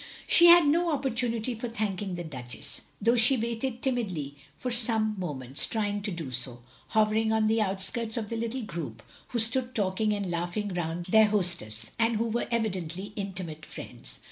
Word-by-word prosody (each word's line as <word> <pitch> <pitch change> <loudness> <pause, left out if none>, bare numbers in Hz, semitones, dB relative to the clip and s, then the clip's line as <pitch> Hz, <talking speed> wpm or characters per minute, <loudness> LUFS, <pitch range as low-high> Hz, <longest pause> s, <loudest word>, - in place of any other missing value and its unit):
She 345 - +8
had 345 -1 +9
no 335 +4 +2
opportunity 245 -5 0
for 235 +1 -5
thanking 200 -4 -3
the 175 - -5
Duchess, 125 -7 -6 0.2
though 230 +4 +3
she 240 +3 +7
waited 235 +2 -3
timidly 185 - -2 0.2
for 250 - -4
some 225 -2 +2
mo 175 -6 -3
ments, 130 +1 -1
trying 205 -2 -2
to 205 - -3
do 165 -7 -5
so; 120 -1 -3 0.2
hovering 220 0 +2
on 220 -1 +2
the 220 +1 +2
outskirts 215 +4 -2
of 215 -3 -3
the 230 - -3
little 230 +2 -3
group 170 -7 -6 0.2
who 245 - -4
stood 245 +3 +1
talking 205 +1 0
and 200 -3 -2
laugh 175 +2 -3
ing 205 -2 -2
round 175 0 -3
their 220 +2 +6
hostess, 170 - 0
and 230 0 +2
who 225 +2 0
were 230 +2 -1
evidently 195 -4 -2
intimate 185 -6 -5
friends. - - -10
215 Hz, 180 wpm, -28 LUFS, 175-230 Hz, 0.2 s, had